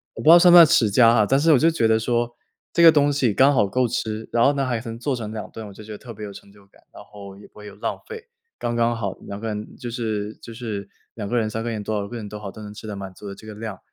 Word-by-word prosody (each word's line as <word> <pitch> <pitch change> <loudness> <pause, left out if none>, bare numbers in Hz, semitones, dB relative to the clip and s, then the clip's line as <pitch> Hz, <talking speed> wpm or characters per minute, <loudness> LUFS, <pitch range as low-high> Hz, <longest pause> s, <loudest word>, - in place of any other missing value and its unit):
我 - - -7
不 - - -9
知 - - +9
道 170 +1 +10
算 175 0 +6
不 - - +8
算 170 - +11
持 115 -7 +3
家 115 +3 +5
啊， 115 -2 +4
但 135 +1 +3
是 160 +2 +3
我 - - +6
就 165 - +4
觉 155 -9 +1
得 110 0 +3
说 120 +1 -1 0.4
这 170 - +3
个 165 - +10
东 145 -1 +3
西 135 -6 +1
刚 135 +6 +4
好 105 -6 +2
够 125 +4 0
吃， 110 -1 -4
然 115 - +2
后 140 - +4
呢， 140 -1 -1
还 120 -3 -1
能 115 -2 -7
做 135 +1 -1
成 110 -3 -6
2 110 - -6
顿， 110 -2 -8
我 100 - -11
就 105 - -12
觉 110 - -11
得 105 - -7
特 115 +1 -11
别 105 0 -8
有 100 - -9
成 100 - -14
就 100 -1 -21
感， - - -26
然 - - -12
后 100 -2 -12
也 100 - -14
不 - - -38
会 105 - -12
有 100 - -11
浪 - - -4
费， 455 0 -9 0.3
刚 120 - -3
刚 120 0 +1
好。 100 -4 -3
2 100 0 -8
个 115 - -5
人 105 -1 -6
就 120 - -6
是 110 -3 -3
就 115 - -10
是 110 -4 -6 0.3
2 105 -3 -5
个 120 - -1
人、 110 -2 0
3 110 +1 -4
个 120 - -3
人， 110 -2 -4
多 110 +1 -3
少 100 -1 -3
个 120 +3 -7
人 105 -2 -7
都 105 - -8
好， 100 -2 -7
都 110 - -12
能 105 -1 -9
吃 105 - -11
得 105 - -5
满 95 -1 -8
足 105 - -11
的 100 - -6
这 110 - -14
个 110 - -8
量， 105 -3 -7
110 Hz, 345 characters per minute, -22 LUFS, 105-120 Hz, 0.4 s, 算